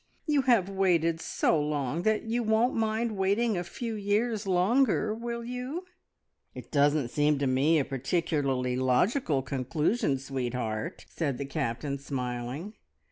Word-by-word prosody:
You 295 -3 +3
have 235 -8 +3
waited 170 -4 +1
so 155 - +1
long 145 +1 -1
that 215 +3 +1
you 230 +2 -1
won't 220 +2 +2
mind 220 0 0
waiting 200 +4 +1
a 175 - -1
few 230 +6 -5
years 210 +1 0
longer, 215 +4 +2
will 235 +1 -4
you?" 250 +9 -5 0.7
"It - - -10
doesn't 145 -3 +3
seem 150 +2 +2
to 140 - 0
me 135 +5 +3
a 140 - +1
particularly 135 -3 -1
logical 135 - +1
conclusion, 140 - 0
sweetheart!" 125 -5 -4
the 140 -4 -1
Captain 140 0 -2
said, 140 - -17
smiling. 125 - -4
165 Hz, 135 wpm, -29 LUFS, 135-220 Hz, 0.7 s, You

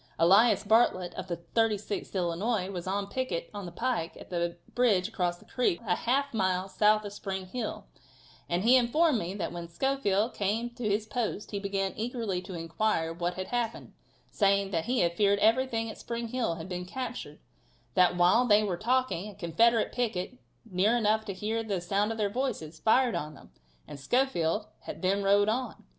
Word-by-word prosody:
Elias 200 +6 +5
Bartlett 200 -5 +3
of 185 - -6
the 170 -2 -3 0.2
36th 215 -3 0
Illinois, 185 +3 -1
was 180 -2 -6
on 200 +1 -1
picket 200 -7 -3
on 200 -3 -6
the - - -7
pike 225 -5 -2
at - - -13
the 170 -1 -1 0.2
bridge 215 -7 +3
across 175 -1 -1
the - - -19
creek 245 -9 0
a 180 - +2
half 275 +3 0
mile 185 -3 0
south 210 +2 +3
of 205 - -6
Spring 190 -2 -4
Hill, 220 +4 -5 0.6
and 175 +2 0
he 245 +3 +6
informed 260 +3 +3
me 180 +2 -4
that 200 - -3
when 170 -1 -6
Schofield 220 +2 0
came 220 +4 -1
to 240 -3 -3
his 205 +2 0
post 220 -2 -3
he 200 - -2
began 195 -1 -2
eagerly 225 -5 -2
to 185 - -8
inquire 165 0 -1
what 175 +1 -2
had 185 0 -5
happened, 240 -2 -3 0.4
saying 200 -1 +2
that 165 -3 -1
he 250 +1 +1
had 170 0 +1
feared 200 +1 +3
everything 225 +2 +2
at 220 - -8
Spring 235 -1 -4
Hill 230 -8 -1
had 165 +1 -7
been 180 -1 -4
captured; 255 +6 -6 0.6
that 180 -1 +4
while 185 +8 +4
they 210 -1 +5
were 190 -4 -1
talking, 235 -3 0
a 205 - -12
Confederate 215 +6 +2
picket, 245 0 -2 0.3
near 210 +3 +2
enough 220 -1 +1
to 200 - -4
hear 220 +4 -2
the 205 -4 -2
sound 200 +5 0
of 225 - -4
their 210 -2 +1
voices, 200 - -3
fired 245 +2 +3
on 150 0 -4
them, - - -16 0.4
and 140 - -9
Schofield 210 - +1 0.3
then 195 +2 +1
rode 200 +1 +4
on. 250 +4 -2
205 Hz, 185 wpm, -29 LUFS, 180-230 Hz, 0.6 s, he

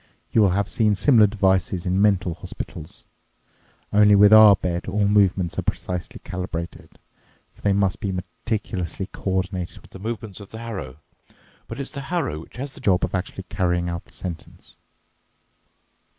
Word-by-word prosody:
You 110 - +4
will 100 - +5
have 100 +2 0
seen 110 -2 +2
similar 110 -2 +5
devices 95 -3 +1
in 95 +2 +1
mental 95 -4 +2
hospitals. 80 -1 -9 0.9
Only 105 0 +6
with 100 +1 +7
our 110 -2 +9
bed 90 -2 -3
all 100 +1 +1
movements 95 -4 +2
are - - +1
precisely 90 -1 -4
calibrated, 90 -2 -6 0.6
for - - -22
they 100 - +2
must 100 -2 +1
be 100 -3 -2
meticulously 95 0 -4
coordinated 95 -1 -3
with - - -19
the 95 - -10
movements 110 -1 -5
of 100 - -11
the 110 - -9
harrow. 95 - -6 0.7
But - - -7
it's 140 - -5
the 140 - -6
harrow 140 - -2
which 85 - -13
has 135 +2 -5
the - - -13
job 95 -2 +2
of - - -9
actually 95 +1 -3
carrying 90 -2 -1
out 85 0 -5
the - - -22
sentence." 85 -3 -8
95 Hz, 165 wpm, -23 LUFS, 90-105 Hz, 0.9 s, our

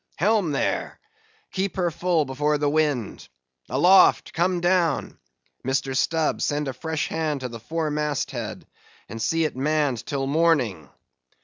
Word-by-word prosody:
Helm 200 -3 +2
there! 140 - -2 0.5
keep 195 0 -2
her 175 -2 0
full 170 -1 +1
before 150 +3 0
the 145 0 0
wind!—Aloft! 125 - +2
come 175 +1 +1
down!—Mr. 135 - -2
Stubb, 160 +3 +1
send 145 -1 -1
a 135 - -3
fresh 160 +4 -3
hand 155 -4 -2
to 125 - -4
the 115 -1 -8
fore 160 +5 -3
mast 150 -2 -1
head, 110 -5 -6 0.4
and 115 +1 -7
see 165 +7 +1
it 150 - -3
manned 145 -2 0
till 135 -1 -2
morning." 135 - +1
150 Hz, 135 wpm, -24 LUFS, 130-165 Hz, 0.5 s, Helm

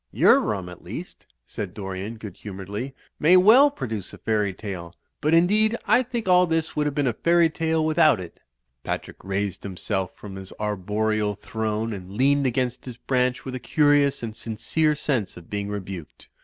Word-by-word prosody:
"Your - - +5
rum 100 -4 -2
at 90 -1 -11
least," - - -8 0.2
said 100 -4 -6
Dorian, 95 +2 -5
good 105 -5 -9
humouredly, 105 +6 -6 0.2
"may 175 +5 +6
well 230 +10 +7
produce 115 - -5
a - - -9
fairy 105 -2 0
tale. 95 -3 -7 0.3
But, 155 +2 +3
indeed, 215 +7 +3
I 250 - +5
think 240 -4 -4
all 180 0 +5
this 165 -1 -1
would 150 0 +1
have 145 - -3
been 145 -2 +1
a 125 - +1
fairy 170 +5 +3
tale 160 0 0
without 155 - +4
it." 90 -2 -9 0.4
Patrick - - -4
raised 100 -1 -2
himself 95 0 -3
from 100 -2 -9
his 95 0 -8
arboreal 105 +1 -1
throne, 110 +1 -3
and 95 -1 -8
leaned 140 +1 +3
against 125 0 -1
his 125 -2 -8
branch 125 0 0
with 130 - -5
a 130 - -4
curious 145 -2 +3
and 110 -2 -5
sin 115 -1 -6
cere 150 +7 +2
sense 130 -11 -1
of 85 - -14
being 100 0 -2
rebuked. 95 -5 -7
115 Hz, 185 wpm, -24 LUFS, 100-150 Hz, 0.4 s, well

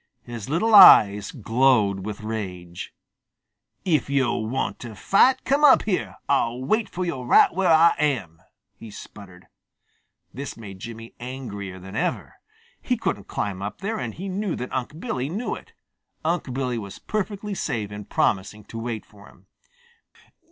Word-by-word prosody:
His 120 -1 -8
little 215 +9 +1
eyes 105 - +8
glowed 110 -5 +2
with 105 -1 -6
rage. 90 -6 -6 0.9
"If 160 -6 +1
yo' 135 -4 +1
want 110 +5 -2
to 115 -3 -8
fight, 250 - +3
come 280 +3 +1
up 285 -3 +7
here. 195 -4 -2
I'll 125 -3 +1
wait 215 - +1
fo' 185 - -4
yo' 170 -7 -3
right 125 - +5
where 185 0 +1
Ah 165 +1 +6
am," 115 - -1 0.3
he 115 - -12
sputtered. 100 -3 -12 0.9
This 140 +1 -7
made 100 -4 -10
Jimmy 115 +2 -9
angrier 120 -7 -7
than 95 +1 -10
ever. - - -2 0.5
He - - -1
couldn't - - -3
climb 100 -2 -3
up 100 +1 -6
there, 220 +3 -2
and 115 -3 -5
he 190 +3 -6
knew 195 -1 -2
that 125 - -6
Unc' 130 +5 -4
Billy 140 - -3
knew 210 +9 -3
it. - - -10 0.5
Unc' 165 -5 -1
Billy 125 -2 -2
was 100 -3 -8
perfectly 210 -1 -4
safe 115 - -3
in 105 0 -8
promising 105 +2 -1
to 115 +2 -8
wait 115 -2 -4
for 100 -1 -17
him. - - -21
120 Hz, 160 wpm, -24 LUFS, 105-170 Hz, 0.9 s, eyes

